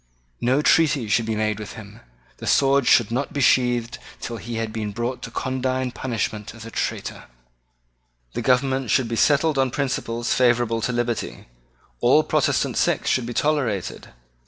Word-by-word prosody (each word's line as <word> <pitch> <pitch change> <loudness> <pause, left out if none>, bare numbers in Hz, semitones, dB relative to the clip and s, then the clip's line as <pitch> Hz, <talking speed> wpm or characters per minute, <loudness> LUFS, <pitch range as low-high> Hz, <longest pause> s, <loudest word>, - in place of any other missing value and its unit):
No 130 +5 +2
treaty 145 -9 +3
should 110 +2 +1
be 110 - -1
made 110 0 -1
with 105 - -7
him. 105 -1 -11 0.4
The - - -8
sword 135 -1 +3
should 115 -2 +4
not 130 +4 -2
be 145 - -2
sheathed 120 -2 +2 0.2
till 115 - -5
he 115 +1 -6
had 115 -1 -3
been 105 -2 -3
brought 120 +4 -3
to - - -6
condign 130 +1 -2
punishment 110 -4 -4
as 115 -1 -10
a 115 - -9
traitor. - - -4 1.1
The - - -3
government 130 0 +1
should 130 +2 +2
be 115 - -3
settled 145 +3 +3
on 130 -1 +2
principles 120 -3 -2
favourable 120 -2 +2
to 125 - -1
liberty. 120 -1 -3 0.5
All - - +4
Protestant - - 0
sects - - +1
should 125 -2 0
be 120 - -4
tolerated. 135 - -1
120 Hz, 165 wpm, -23 LUFS, 115-130 Hz, 1.1 s, should